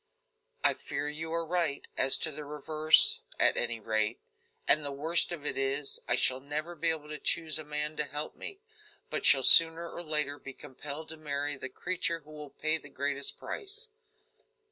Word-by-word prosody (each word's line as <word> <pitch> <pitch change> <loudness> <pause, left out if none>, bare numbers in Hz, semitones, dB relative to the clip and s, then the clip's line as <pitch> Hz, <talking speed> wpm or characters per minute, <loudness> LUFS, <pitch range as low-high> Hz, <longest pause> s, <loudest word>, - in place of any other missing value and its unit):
"I - - +3
fear 145 +1 -6
you 160 +2 -5
are 165 0 -2
right, 165 -4 -2
as 135 - +6
to 160 - -2
the 150 +1 -7
reverse, 155 +2 +4 0.2
at - - +4
any 120 -1 0
rate; 110 +1 -1 0.5
and 150 +1 +4
the 145 - -3
worst 160 +6 0
of 160 -4 -7
it - - -2
is, 135 +1 -1
I 120 - +2
shall 130 +1 +2
never 150 +5 -5
be 170 -1 0
able 155 -2 -4
to 150 - -5
choose 160 -2 +2
a - - -5
man 150 +1 -5
to 150 - +1
help 150 +2 -7
me, 395 0 -9 0.5
but - - -3
shall - - +6
sooner 165 0 +7
or - - -7
later 150 -3 +1
be 135 - -10
compelled 145 +5 -10
to 160 - -8
marry 145 -1 -3
the 130 0 -7
creature 170 +2 -2
who 150 +1 -18
will 150 -1 -10
pay 155 +3 0
the 145 - -15
greatest 140 0 -3
price." 440 +2 -6
150 Hz, 190 wpm, -29 LUFS, 140-160 Hz, 0.5 s, sooner